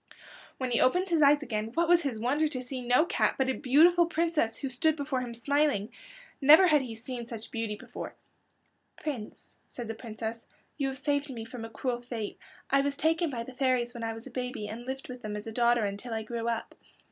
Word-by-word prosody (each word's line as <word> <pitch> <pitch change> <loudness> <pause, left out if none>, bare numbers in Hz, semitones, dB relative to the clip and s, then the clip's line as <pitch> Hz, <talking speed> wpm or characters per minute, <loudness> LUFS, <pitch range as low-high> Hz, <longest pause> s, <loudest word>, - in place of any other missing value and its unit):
When 255 -2 -2
he 235 - +2
opened 360 +9 +3
his 330 -2 +3
eyes 290 +1 +6
again 220 -3 -3
what 340 0 +2
was 345 0 +6
his 265 -8 -2
wonder 280 +7 +2
to 275 -4 -4
see 255 +1 -5
no 250 +6 +4
cat, - - +1
but 265 -1 +2
a - - -1
beautiful 325 +7 +5
princess 330 -9 0
who 275 - -3
stood 305 +5 +1
before 280 -3 -2
him 240 -2 -5
smiling. 280 -4 +1 0.5
Never 310 +7 +9
had 305 -5 +5
he 240 -4 -6
seen 240 +1 -6
such 230 -2 -7
beauty 225 -4 -2
before. - - -8 0.8
"Prince," 255 -9 -6
said 240 -2 -7
the 225 - -3
Princess, 225 0 -6 0.3
"you 280 -2 -1
have 265 0 -4
saved 285 +2 0
me 230 -4 -6
from 230 0 -8
a 225 - -6
cruel 240 +2 -2
fate. 235 -4 -5 0.3
I 275 0 +5
was 280 0 -1
taken 325 +3 +1
by 240 -4 -3
the 260 - -10
fairies 250 -2 +1
when 235 -2 -6
I 225 0 -2
was 225 +1 -10
a - - -10
baby 250 -4 -4
and 230 +4 -7
lived 265 +1 -5
with 250 -1 -8
them 210 -2 -4
as 210 - -6
a 225 - -5
daughter 235 0 +3
until 205 +4 -4
I 220 - -2
grew 230 +1 -4
up. 230 -1 -2
250 Hz, 225 wpm, -29 LUFS, 230-285 Hz, 0.8 s, Never